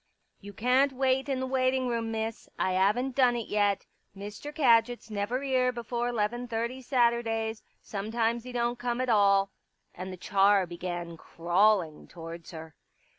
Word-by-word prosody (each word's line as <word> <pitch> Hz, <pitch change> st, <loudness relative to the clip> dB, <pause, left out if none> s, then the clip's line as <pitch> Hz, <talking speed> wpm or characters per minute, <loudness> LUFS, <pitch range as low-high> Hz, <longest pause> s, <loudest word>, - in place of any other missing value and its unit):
" -, -, -47 dB
You 205 Hz, 0 st, -9 dB
can't 255 Hz, +6 st, +2 dB
wait 265 Hz, +1 st, +1 dB
in 265 Hz, -2 st, 0 dB
the 260 Hz, -, -2 dB
waiting 260 Hz, 0 st, +1 dB
room, 230 Hz, -2 st, -2 dB
Miss. 220 Hz, 0 st, -4 dB
I 185 Hz, -, 0 dB
'aven't 210 Hz, +8 st, +1 dB
done 250 Hz, -3 st, +4 dB
it 235 Hz, -2 st, -4 dB
yet. 205 Hz, -2 st, +1 dB, 0.3 s
Mr. 205 Hz, +8 st, -7 dB
Kadgit's 240 Hz, -5 st, +2 dB
never 215 Hz, +6 st, -2 dB
'ere 255 Hz, -2 st, +2 dB
before 240 Hz, 0 st, -3 dB
'leven 240 Hz, +2 st, -2 dB
thirty 235 Hz, +3 st, -3 dB
Saturdays. 235 Hz, -3 st, 0 dB, 0.2 s
Sometimes 225 Hz, +3 st, -2 dB
'e -, -, -6 dB
don't 240 Hz, 0 st, -1 dB
come 245 Hz, 0 st, -2 dB
at 255 Hz, 0 st, -1 dB
all." 200 Hz, -2 st, +4 dB, 0.4 s
And 185 Hz, +1 st, -7 dB
the 185 Hz, -, -8 dB
char 195 Hz, +1 st, +3 dB
began 175 Hz, -1 st, -6 dB
crawling 175 Hz, 0 st, +1 dB
towards 165 Hz, -1 st, -9 dB
her. 160 Hz, -2 st, -9 dB
225 Hz, 160 wpm, -28 LUFS, 200-250 Hz, 0.4 s, done